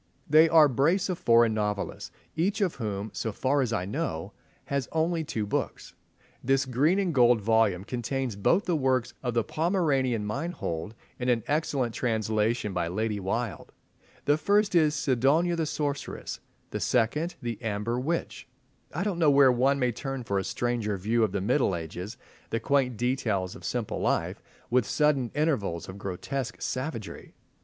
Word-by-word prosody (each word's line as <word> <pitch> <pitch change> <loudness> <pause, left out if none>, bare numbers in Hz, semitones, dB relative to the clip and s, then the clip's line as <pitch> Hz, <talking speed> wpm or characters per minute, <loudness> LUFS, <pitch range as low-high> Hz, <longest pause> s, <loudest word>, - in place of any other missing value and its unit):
They 155 +2 +6
are 160 -2 +7
a - - +2
brace 165 - +2
of 180 - -2
foreign 115 -1 +4
novelists, 105 -2 -2 0.3
each 190 +7 0
of 195 -5 +1
whom, 105 -3 -3
so 110 +4 -2
far 135 +7 +1
as 125 -3 -1
I 90 -5 -1
know, 100 - -3 0.3
has 140 -3 -2
only 165 +1 0
two 110 -8 -3
books. 100 - -3 0.5
This 135 +1 +2
green 140 +8 +2
and 190 -4 0
gold 120 -3 +5
volume 110 -3 +2
contains 125 +1 -3
both 170 - +2
the 175 - +1
works 130 -4 +1
of 125 -2 -2
the 115 - +3
Pomeranian 140 - 0
Meinhold 110 - -4 0.2
in 125 0 -1
an 120 -3 +2
excellent 145 -5 0
translation 110 -2 0
by 85 -2 -1
Lady 105 +4 -2
Wilde. 110 +3 -3 0.5
The 145 +1 +3
first 205 +3 +2
is 155 -3 +4
"Sidonia 140 +6 +2
the 165 -2 -1
Sorceress," 145 -1 -3 0.3
the - - -3
second, 150 +9 +1
"The 120 -2 -5
Amber 110 +2 -2
Witch." 165 +6 -3 0.4
I 180 - -2
don't 195 -4 -2
know 160 -3 +5
where 140 -2 +6
one 130 +3 +2
may 125 -2 +1
turn 135 +2 -5
for 100 -4 0
a - - -2
stranger 115 -2 -1
view 110 +5 +1
of 110 - +1
the 100 -1 -2
Middle 120 -1 +2
Ages, 90 +7 -6 0.3
the 115 - -1
quaint 130 -4 +1
details 110 -7 -1
of 85 - -12
simple 115 +5 -2
life, - - 0 0.3
with 125 +1 +3
sudden 150 -5 +2
intervals 135 - 0
of 95 +2 -9
grotesque 115 +7 -4
savagery. 130 -5 -5
125 Hz, 165 wpm, -28 LUFS, 110-150 Hz, 0.5 s, are